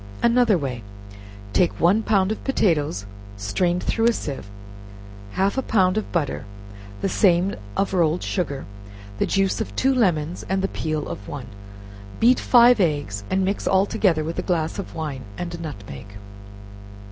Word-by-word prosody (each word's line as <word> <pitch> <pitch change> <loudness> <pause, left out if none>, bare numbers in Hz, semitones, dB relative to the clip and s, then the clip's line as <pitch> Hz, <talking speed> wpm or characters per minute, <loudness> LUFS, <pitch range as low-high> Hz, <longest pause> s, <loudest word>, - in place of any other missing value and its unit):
Another 235 -4 +4
Way. 130 -6 -4 0.7
Take 180 - +2
one 190 +6 +4
pound 200 -3 +2
of 220 - -4
potatoes 150 - +1 0.3
strained 175 - 0
through 225 0 +1
a 235 - +4
sieve, 135 - -5 0.8
half 200 +7 +1
a - - +1
pound 185 -7 +2
of 215 - -3
butter, 160 -10 -1 0.6
the - - +1
same 185 0 +3 0.2
of 195 - 0
rolled 170 -2 +2
sugar, 145 -8 -2 0.5
the - - +1
juice 195 +2 +1
of - - -5
two 270 +1 +2
lemons 175 - +1
and 190 0 0
the - - +2
peel 155 -5 -3
of 100 - -7
one; 130 -5 -7 0.7
beat 245 +3 +5
five 245 -1 +6
eggs, 145 - 0
and 190 0 +1
mix 195 +2 -2
all 190 0 +4
together 190 -8 +1
with 165 +2 -4
a - - +1
glass 165 -1 -1
of 200 - -7
wine 150 -5 -4 0.2
and 175 -1 -4
a 170 - -6
nutmeg. 100 -11 -8
180 Hz, 160 wpm, -23 LUFS, 155-200 Hz, 0.8 s, five